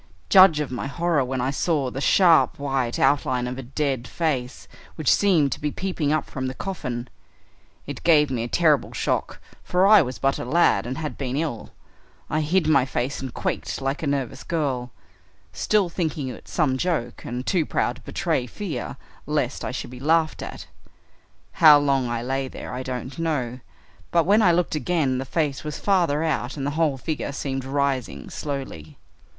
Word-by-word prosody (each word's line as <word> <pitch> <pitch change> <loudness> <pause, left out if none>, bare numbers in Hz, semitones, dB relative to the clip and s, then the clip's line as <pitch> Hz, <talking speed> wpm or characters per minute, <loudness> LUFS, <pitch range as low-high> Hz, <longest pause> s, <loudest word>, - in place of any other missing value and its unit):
Judge 185 -5 +7
of 150 -4 -3
my 125 +2 -3
horror 165 0 +1
when 130 0 -2
I 130 +2 0
saw 145 -4 0
the 135 - -5
sharp 170 +3 +4
white 135 -4 -1
outline 130 -2 +2
of 125 +1 -5
a - - -3
dead 130 -1 -2
face, 135 -7 -2 0.3
which 155 -4 +3
seemed 170 -9 +3
to - - -3
be 150 - 0
peeping 165 -3 -2
up 155 - 0
from 130 -1 -4
the 130 - -5
coffin. 125 -11 -4 0.8
It - - -7
gave 150 -4 +4
me 120 -3 -1
a 115 - -2
terrible 155 +1 +2
shock - - -2 0.2
for 180 +1 +2
I 210 0 +8
was 130 -4 -3
but 135 0 0
a - - -3
lad 125 -6 +2
and 130 - -4
had 155 -2 -5
been 130 -2 -2
ill. 150 -7 -3 0.6
I 155 - +1
hid 170 +4 +1
my 140 -4 +4
face 130 +1 -3
and 130 -2 -5
quaked - - -3
like 135 +2 -2
a 160 - -2
nervous 140 -4 -2
girl, 135 -7 -2 0.6
still 210 -3 +2
thinking 160 -5 -3
it - - -10
some 140 -6 +1
joke 140 -9 -2
and 125 +1 -5
too 180 -5 +2
proud - - -1
to - - -16
betray 125 - -1
fear 155 - -5 0.3
lest - - -1
I - - -2
should - - -5
be 125 - -9
laughed 160 +3 +1
at. - - -7 1.0
How 155 -3 +10
long 135 -3 +1
I 120 0 -2
lay 135 +1 -2
there 130 - -8
I 125 - -4
don't 130 +2 -5
know, 130 -7 -2 0.5
but 170 -1 +3
when 205 +4 +4
I 185 -5 +5
looked 175 0 +1
again 150 -5 0
the 135 - -4
face 145 -1 -1
was 150 -1 -5
farther 170 -6 +1
out 150 -4 -2
and 135 - -3
the 145 - -1
whole 155 -3 +1
figure 150 +1 -3
seemed 135 -1 -3
rising 135 -2 -2
slowly. 130 - -6
140 Hz, 190 wpm, -24 LUFS, 130-160 Hz, 1.0 s, How